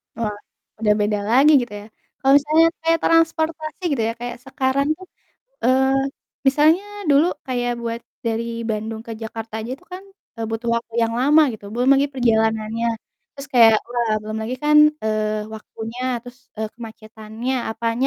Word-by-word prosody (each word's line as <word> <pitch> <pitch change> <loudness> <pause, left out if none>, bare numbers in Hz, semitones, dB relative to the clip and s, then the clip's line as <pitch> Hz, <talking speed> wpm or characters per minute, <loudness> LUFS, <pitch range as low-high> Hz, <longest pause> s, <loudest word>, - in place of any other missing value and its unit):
Wah, 225 -2 -2 0.5
udah 210 -2 +3
beda 210 0 0
lagi 270 +6 +6
gitu 240 -3 -6
ya. - - -12 0.4
Kalau 270 -1 +4
misalnya 310 +3 +4 0.2
kayak 330 0 +3
transportasi 320 0 +1
gitu 270 -5 0
ya, - - -2
kayak 240 0 -5
sekarang 265 +1 0
tuh, 375 - -13 0.6
eee, 265 +1 +3 0.5
misalnya 305 +6 +4 0.3
dulu 285 +4 +5 0.2
kayak 245 -1 -1
buat 230 0 -4 0.3
dari 230 0 -1 0.2
Bandung 220 0 -3
ke 230 - -6
Jakarta 225 0 -7
aja 225 - -6
itu 350 - -24
kan, 370 +1 -7 0.3
eee, 225 - -3
butuh 225 +1 -3
waktu 230 -1 -6
yang 230 0 0
lama 295 +4 +5
gitu, 215 -2 -10
belum 245 +2 +1
lagi 275 +1 +3
perjalanannya, 225 -2 +1 0.5
terus 275 0 -8
kayak, 225 -3 +7
wah, 240 -2 0
belum 215 +1 -5
lagi 230 +3 -3
kan, 300 0 +4 0.3
eee, 215 -1 -1
waktunya 225 +2 -8 0.2
terus, 245 +1 -12 0.2
eee, 220 0 -3
kemacetannya 220 +1 -6 0.2
apanya 230 +3 -1
235 Hz, 160 wpm, -21 LUFS, 220-275 Hz, 0.6 s, kayak